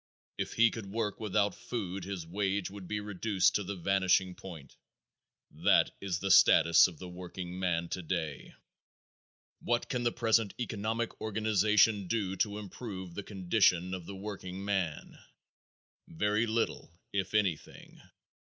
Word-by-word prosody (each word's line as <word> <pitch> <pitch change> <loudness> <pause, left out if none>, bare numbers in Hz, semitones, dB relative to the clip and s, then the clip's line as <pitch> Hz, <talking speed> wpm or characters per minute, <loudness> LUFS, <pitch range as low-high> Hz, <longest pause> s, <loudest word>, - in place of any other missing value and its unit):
If - - -2
he 115 0 +5
could 110 -4 -7
work 105 0 -3
without 105 -2 +1
food 100 -6 -5
his 95 -4 -5
wage 95 +2 -1
would 100 -2 -9
be 105 +2 -2
reduced 105 -2 +1
to 105 - 0
the 100 +2 -5
vanishing 95 0 +2
point. 80 -8 -11 0.8
That - - +3
is 95 -4 -2
the 95 +1 -1
status 85 -1 +7
of 90 -4 -10
the 90 - -8
workingman 90 -1 -3
today. 80 -5 -4 1.0
What 120 0 -1
can 125 -2 -1
the 120 -1 +1
present 115 -3 +1
economic 115 0 -3
organization 105 -1 +2
do 100 -3 -1
to 105 +1 0
improve 100 -3 -7
the 100 - -4
condition 95 -2 +1
of 90 -3 -6
the 100 - -7
workingman? 95 -3 -4 0.9
Very 105 +6 0
little, 110 -5 -1 0.2
if 100 +1 -2
anything. 95 -7 -2
100 Hz, 135 wpm, -31 LUFS, 90-105 Hz, 1.0 s, status